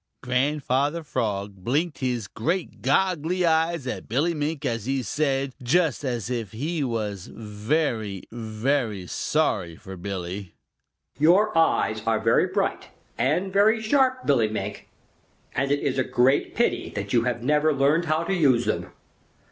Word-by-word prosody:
Grandfather 140 Hz, +4 st, 0 dB
Frog 105 Hz, -8 st, -2 dB
blinked 145 Hz, -, -1 dB
his 125 Hz, -5 st, -1 dB
great 165 Hz, -, -3 dB
goggly 175 Hz, +4 st, +1 dB
eyes 165 Hz, -2 st, +2 dB
at 130 Hz, -, -5 dB
Billy 145 Hz, +9 st, +1 dB
Mink 150 Hz, -1 st, -3 dB
as 115 Hz, -3 st, -2 dB
he 135 Hz, -1 st, 0 dB
said, 135 Hz, +1 st, 0 dB
just 150 Hz, +3 st, +1 dB
as 120 Hz, -5 st, -2 dB
if 115 Hz, -6 st, -3 dB
he 150 Hz, +7 st, -2 dB
was 105 Hz, -6 st, -3 dB
very, 110 Hz, -, -2 dB
very 110 Hz, -2 st, -1 dB
sorry 85 Hz, 0 st, 0 dB
for 95 Hz, +2 st, -10 dB
Billy, 95 Hz, 0 st, -5 dB, 0.6 s
"Your 185 Hz, +8 st, +4 dB
eyes 110 Hz, -9 st, +2 dB
are 110 Hz, -1 st, +2 dB
very 115 Hz, +1 st, +3 dB
bright -, -, -1 dB, 0.3 s
and 180 Hz, +8 st, 0 dB
very 215 Hz, +3 st, +4 dB
sharp, 260 Hz, +3 st, +2 dB
Billy 125 Hz, -6 st, +3 dB
Mink, 110 Hz, -, -5 dB, 0.6 s
and 135 Hz, +2 st, 0 dB
it 145 Hz, -, +1 dB
is 135 Hz, -1 st, 0 dB
a -, -, +3 dB
great 130 Hz, +3 st, +2 dB
pity 235 Hz, -, +1 dB
that 100 Hz, 0 st, -4 dB
you 120 Hz, -1 st, +3 dB
have 120 Hz, -1 st, -1 dB
never 150 Hz, +3 st, +3 dB
learned 145 Hz, +4 st, +2 dB
how 155 Hz, +1 st, +1 dB
to 195 Hz, -, -1 dB
use 135 Hz, -9 st, +3 dB
them. 110 Hz, -, -1 dB
135 Hz, 150 wpm, -25 LUFS, 110-160 Hz, 0.6 s, Your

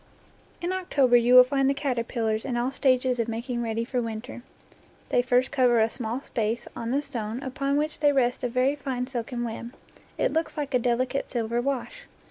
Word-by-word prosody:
In 350 Hz, +2 st, -1 dB
October 280 Hz, -9 st, +2 dB
you 240 Hz, +1 st, +5 dB
will 250 Hz, -, +11 dB
find 270 Hz, +1 st, +1 dB
the 275 Hz, -, +1 dB
caterpillars 235 Hz, -5 st, -1 dB
in 250 Hz, -3 st, -2 dB
all 245 Hz, +2 st, 0 dB
stages 255 Hz, -2 st, +2 dB
of 230 Hz, -, 0 dB
making 240 Hz, +2 st, -3 dB
ready 230 Hz, 0 st, -2 dB
for 250 Hz, 0 st, -1 dB
winter. 230 Hz, +2 st, -6 dB, 0.7 s
They -, -, +3 dB
first 250 Hz, +1 st, +1 dB
cover 250 Hz, -4 st, +3 dB
a 220 Hz, +1 st, +2 dB
small 240 Hz, +1 st, -4 dB
space 230 Hz, +1 st, -2 dB
on 230 Hz, -, -4 dB
the 280 Hz, +4 st, 0 dB
stone 235 Hz, -3 st, -5 dB
upon 275 Hz, +2 st, -1 dB
which 305 Hz, +1 st, -1 dB
they 290 Hz, -1 st, +4 dB
rest 250 Hz, -3 st, +1 dB
with 245 Hz, -, -1 dB
a -, -, -11 dB
very 255 Hz, +3 st, +2 dB
fine 260 Hz, -4 st, -3 dB
silken 245 Hz, -1 st, -4 dB
web; 235 Hz, +1 st, -6 dB, 0.4 s
it -, -, +1 dB
looks 320 Hz, -1 st, -1 dB
like 290 Hz, -2 st, -3 dB
a 250 Hz, -, +4 dB
delicate 250 Hz, +3 st, 0 dB
silver 235 Hz, -1 st, -1 dB
wash. 280 Hz, -, -3 dB
250 Hz, 200 wpm, -26 LUFS, 235-275 Hz, 0.7 s, will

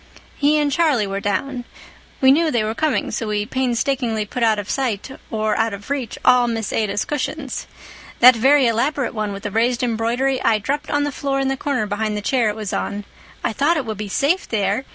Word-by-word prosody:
"He 295 Hz, +1 st, +3 dB
and 295 Hz, -1 st, +1 dB
Charlie 290 Hz, -8 st, +2 dB
were 195 Hz, 0 st, -3 dB
down. 245 Hz, +5 st, -2 dB, 0.6 s
We 265 Hz, 0 st, +7 dB
knew 320 Hz, +3 st, +3 dB
they 235 Hz, -7 st, +1 dB
were 215 Hz, +1 st, -1 dB
coming, 300 Hz, 0 st, 0 dB
so 225 Hz, -, -3 dB
we 210 Hz, -1 st, -1 dB
painstakingly 245 Hz, -2 st, -1 dB
put 245 Hz, +4 st, -5 dB
out 220 Hz, -2 st, +3 dB
of 205 Hz, -1 st, -4 dB
sight 255 Hz, -2 st, -2 dB, 0.2 s
or 215 Hz, -1 st, 0 dB
out 225 Hz, -2 st, 0 dB
of 200 Hz, +7 st, -10 dB
reach 265 Hz, -5 st, -3 dB
all 250 Hz, -1 st, +5 dB
Miss 225 Hz, -2 st, -2 dB
Ada's 205 Hz, -2 st, 0 dB
cushions. 295 Hz, -1 st, -4 dB, 0.5 s
That 250 Hz, +1 st, +9 dB
very 270 Hz, +4 st, +4 dB
elaborate 250 Hz, +4 st, 0 dB
one 215 Hz, -2 st, -2 dB
with 200 Hz, 0 st, -7 dB
the 205 Hz, -, -3 dB
raised 235 Hz, +3 st, +1 dB
embroidery 245 Hz, +3 st, 0 dB
I 225 Hz, -2 st, +3 dB
dropped 285 Hz, +8 st, -3 dB
on 290 Hz, 0 st, +1 dB
the 290 Hz, -, -1 dB
floor 275 Hz, 0 st, -2 dB
in 270 Hz, 0 st, 0 dB
the 270 Hz, -, 0 dB
corner 265 Hz, -4 st, -1 dB
behind 210 Hz, +1 st, -2 dB
the -, -, -3 dB
chair 235 Hz, 0 st, +1 dB
it 210 Hz, -, -3 dB
was 215 Hz, -3 st, -5 dB
on. 205 Hz, 0 st, -3 dB, 0.4 s
I 225 Hz, -, 0 dB
thought 295 Hz, +8 st, +2 dB
it 280 Hz, -, -2 dB
would 215 Hz, -2 st, -5 dB
be 210 Hz, -1 st, -4 dB
safe 310 Hz, -, +1 dB
there. 205 Hz, +3 st, 0 dB
240 Hz, 215 wpm, -20 LUFS, 215-275 Hz, 0.6 s, That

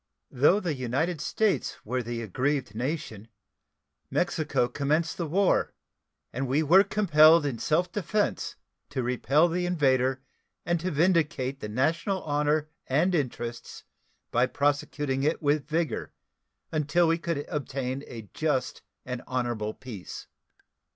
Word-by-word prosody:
Though 145 Hz, +10 st, +4 dB
the 175 Hz, -6 st, -2 dB
United 145 Hz, +6 st, -1 dB
States 215 Hz, -3 st, 0 dB
were 125 Hz, +4 st, -1 dB
the 115 Hz, 0 st, -4 dB
aggrieved 130 Hz, +3 st, -1 dB
nation, 120 Hz, -3 st, -4 dB, 0.8 s
Mexico 120 Hz, -, 0 dB
commenced 150 Hz, +6 st, 0 dB
the 170 Hz, -, -2 dB
war, 190 Hz, +5 st, +2 dB, 0.6 s
and 135 Hz, +2 st, -2 dB
we 140 Hz, +5 st, +2 dB
were 180 Hz, +6 st, +6 dB
compelled 165 Hz, -6 st, +5 dB
in 130 Hz, -5 st, -2 dB
self 175 Hz, +3 st, +1 dB
defense 205 Hz, +2 st, -1 dB, 0.3 s
to 130 Hz, -2 st, -2 dB
repel 135 Hz, +6 st, +3 dB
the 175 Hz, +1 st, -1 dB
invader 130 Hz, -5 st, +1 dB, 0.4 s
and 175 Hz, -1 st, +1 dB
to 180 Hz, +3 st, -2 dB
vindicate 150 Hz, -5 st, +1 dB
the 105 Hz, -, -6 dB
national 165 Hz, -, 0 dB
honor 150 Hz, +1 st, +1 dB, 0.2 s
and 160 Hz, +8 st, +2 dB
interests 120 Hz, -6 st, -3 dB, 0.5 s
by 120 Hz, +2 st, +3 dB
prosecuting 145 Hz, -1 st, 0 dB
it 150 Hz, +3 st, +1 dB
with 145 Hz, -1 st, +1 dB
vigor 160 Hz, -4 st, -2 dB, 0.6 s
until 155 Hz, +2 st, +2 dB
we 165 Hz, +1 st, +2 dB
could 165 Hz, -4 st, -2 dB
obtain 135 Hz, -2 st, -3 dB
a 115 Hz, -3 st, -9 dB
just 140 Hz, -5 st, -1 dB, 0.2 s
and 125 Hz, -1 st, -4 dB
honorable 120 Hz, -4 st, -2 dB
peace. 120 Hz, -8 st, -8 dB
145 Hz, 130 wpm, -27 LUFS, 130-165 Hz, 0.8 s, were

